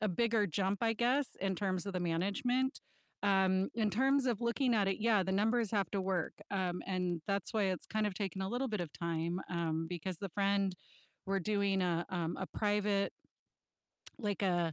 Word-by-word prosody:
a 215 - +1
bigger 220 +2 +2
jump, 195 +5 0
I 225 0 +3
guess, 250 +4 +1
in 190 -1 0
terms 185 -1 -1
of 200 - -3
the 180 - -1
management. 225 - 0 0.4
Um, 190 -1 +3
in 215 -3 +1
terms 265 +5 +3
of 235 -3 0
looking 235 +1 +2
at 200 -2 +3
it, 195 - 0
yeah, 215 -3 +4
the 190 - -2
numbers 220 +2 +2
have 200 -5 +1
to 200 - +1
work, 185 -3 -1 0.2
um, 185 -2 -1
and 180 -3 -1
that's 200 +3 -1
why 215 - +3
it's 185 -2 -1
kind 215 -1 0
of 200 - -6
taken 190 -1 -3
a 190 - -1
little 245 +4 -1
bit 210 -3 -2
of 170 -4 -4
time, 170 +1 -2
um, 165 -2 -1
because 175 +1 -4
the 195 - -4
friend 195 0 +1 0.5
we're 195 0 +1
doing 200 0 +1
a 175 -1 +1
um, 170 -2 -2
a 190 - -3
private 205 -1 +1 1.1
like 205 -4 -2
a 175 -3 +2
195 Hz, 195 wpm, -34 LUFS, 180-215 Hz, 1.1 s, yeah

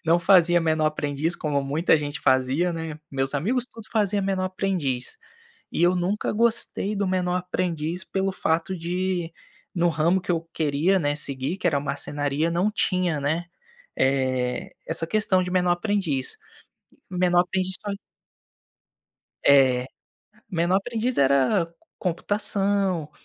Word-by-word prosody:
Não 165 +2 +4
fazia 175 -1 +5
menor 155 -1 +1
aprendiz, 155 +2 -1
como 145 -2 -1
muita 155 +5 +2
gente 145 0 -4
fazia, 130 +6 +2
né. 160 -2 -5
Meus 135 +1 -1
amigos 240 - 0
todos 225 -3 -13
fazia 205 -3 +1
menor 190 -1 0
aprendiz, 185 - -2 0.5
e 170 - -1
eu 180 +1 +4
nunca 185 +4 -1
gostei 220 -2 +1
do 200 -1 0
menor 180 -1 0
aprendiz, 180 -1 -2
pelo 195 0 -1
fato 170 +1 -1
de, 175 0 -2 0.4
no 175 0 +2
ramo 170 +4 +2
que 180 - -6
eu 165 -1 -1
queria, 160 +5 +2
né, 145 -2 0
seguir, 140 +4 -2
que - - -2
era 145 -4 +2
a - - -3
marcenaria, 145 +2 -1
não 180 +5 +1
tinha, 180 -6 0
né, 160 +5 -1 0.5
eh, 130 -2 0
essa 165 - -2
questão 195 -2 +2
de 180 - -4
menor 180 -1 +2
aprendiz. 175 -8 -1 0.7
Menor 180 -1 +2
aprendiz 185 +1 -1
só 205 - -5 1.5
É. 130 -3 +5 0.6
Menor 175 +1 +2
aprendiz 235 +4 -1
era 140 +7 +3 0.3
computação, 195 -2 0
175 Hz, 135 wpm, -24 LUFS, 145-190 Hz, 1.5 s, fazia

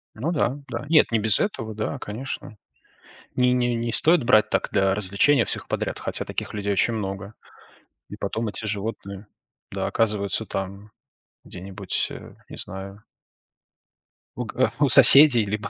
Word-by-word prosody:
Ну 140 +10 -3
да, 140 -4 0
да. 145 - -5
Нет, 155 -6 +4
не 115 - +2
без 110 -1 +1
этого, 115 - -3
да, 110 0 -4
конечно. 110 0 -7 0.8
Не 125 0 +2
не 120 -1 +1
не 115 0 -3
стоит 165 +4 +4
брать 115 -3 +3
так - - 0
для 95 -1 +2
развлечения 105 +6 +2
всех - - -5
подряд, - - -3
хотя - - -4
таких - - -6
людей 100 -1 -2
очень 115 +4 +1
много. 100 0 -5 0.8
И - - -8
потом 115 +1 -3
эти 110 +1 -5
животные, 100 -1 -5 0.4
да, - - -3
оказываются 105 -1 -1
там 100 +2 -6 0.5
где-нибудь, 95 +1 -5
э, - - -11
не - - -11
знаю. 95 +2 -8 1.3
У 125 - -2
га 130 +4 0
у 145 -2 +3
соседей, 135 -2 +8
либо 105 +2 -4
110 Hz, 155 wpm, -23 LUFS, 100-125 Hz, 1.3 s, соседей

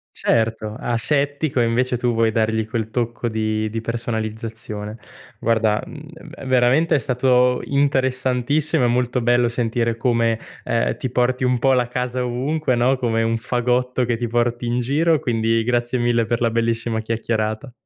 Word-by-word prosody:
Certo, 110 -1 0
asettico 140 +3 0
invece 125 +2 +1
tu 120 0 0
vuoi 115 0 +2
dargli 110 0 0
quel 110 -1 -3
tocco 120 0 -2
di 110 -1 -1
di 115 +1 -3
personalizzazione. 110 -2 -4 0.4
Guarda, 110 -2 +1
mhmm, - - -10
v - - -12
veramente 130 +6 +3
è - - +4
stato 125 -1 +2
interessantissimo, 135 +1 +1
è - - +3
molto 125 +1 0
bello 120 0 +3
sentire 115 -1 -1
come, 115 -2 +1 0.3
ehm, 115 -1 0
ti 130 - -3
porti 125 +1 0
un 125 0 +2
po' 135 +2 +3
la 125 -1 +2
casa 125 0 -2
ovunque, 130 +3 -1
no, 125 +2 +2
come 115 -3 0
un 115 0 0
fagotto 125 +2 0
che 120 -1 -1
ti 120 +1 -2
porti 120 +1 0
in 120 +1 0
giro 150 +6 +2
quindi 115 -2 0
grazie 120 +1 0
mille 120 -1 +2
per 120 +1 -1
la 115 - +3
bellissima 115 0 0
chiacchierata. 110 +1 -2
120 Hz, 160 wpm, -21 LUFS, 115-125 Hz, 0.4 s, è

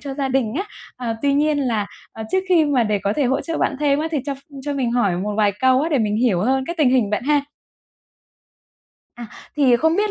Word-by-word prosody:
cho 275 -2 -6
gia 275 -1 -2
đình 260 -4 0
á. 380 +7 -2 0.3
À, 235 -3 -3
tuy 285 -1 +2
nhiên 300 +1 +2
là, 230 -7 -1 0.3
ờ, 220 - -7
trước 375 - +3
khi 340 -4 +4
mà 280 -4 +2
để 210 -1 0
có 200 - 0
thể 290 - +1
hỗ 260 +2 +1
trợ 330 -1 -4
bạn 275 - 0
thêm 285 -1 +2
á, 315 +2 -1
thì 310 - 0
cho 280 - -2
ph - - -15 0.2
cho 290 +1 -3
mình 260 -4 -1
hỏi 205 -7 +1
một 205 +3 -3
vài 210 -2 +3
câu 260 0 +4
á 320 - 0
để 295 -4 +1
mình 210 -2 0
hiểu 220 -6 +2
hơn 260 +6 +1
cái 340 - -3
tình 285 -5 +4
hình 245 -6 +2
bạn 210 - -1
ha? 295 +1 +3 1.7
À, 240 -1 -8 0.3
thì 265 -5 +4
không 320 +6 +1
biết 420 +1 +1
265 Hz, 255 wpm, -21 LUFS, 225-295 Hz, 1.7 s, khi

